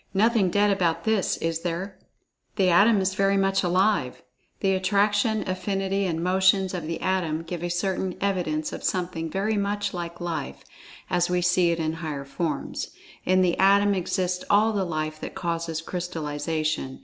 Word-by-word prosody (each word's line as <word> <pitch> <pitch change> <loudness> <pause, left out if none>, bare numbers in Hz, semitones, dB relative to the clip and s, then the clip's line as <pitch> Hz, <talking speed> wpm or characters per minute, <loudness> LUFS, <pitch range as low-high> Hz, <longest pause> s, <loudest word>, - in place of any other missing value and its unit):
Nothing 215 -1 +3
"dead" 205 +3 +3
about 175 -4 0
this, 220 -3 +1
is 165 0 -2
there? 180 +3 -4 0.6
The 190 -3 +3
Atom 205 +5 +5
is 190 0 0
"very 195 +1 +2
much 195 0 +2
alive." 180 -6 +1 0.4
The 195 -1 +2
Attraction; 205 +3 +2
Affinity; 195 +1 -1
and 165 -1 -2
Motions, 190 +1 +3
of 170 -4 -4
the 165 0 -3
Atom, 170 -4 0
give 165 0 -6
a 175 - -2
certain 185 +1 -1
evidence 175 -6 -1
of - - -7
something 175 -3 -2
"very 205 +5 -1
much 205 0 -1
like 170 -1 -5
Life," 165 -5 -4 0.5
as 175 0 +2
we 180 0 +1
see 180 0 +3
it 170 - 0
in 160 -1 -1
higher 145 -4 -4
forms. 145 +1 -3 0.4
In 185 0 +4
the 175 -1 +2
Atom 200 +1 +5
exists 180 -1 -1
all 215 +2 +4
the 195 -2 0
Life 155 -2 -3
that - - -6
causes 165 -1 -3
crystallization. 155 -4 -3
180 Hz, 165 wpm, -25 LUFS, 165-195 Hz, 0.6 s, Atom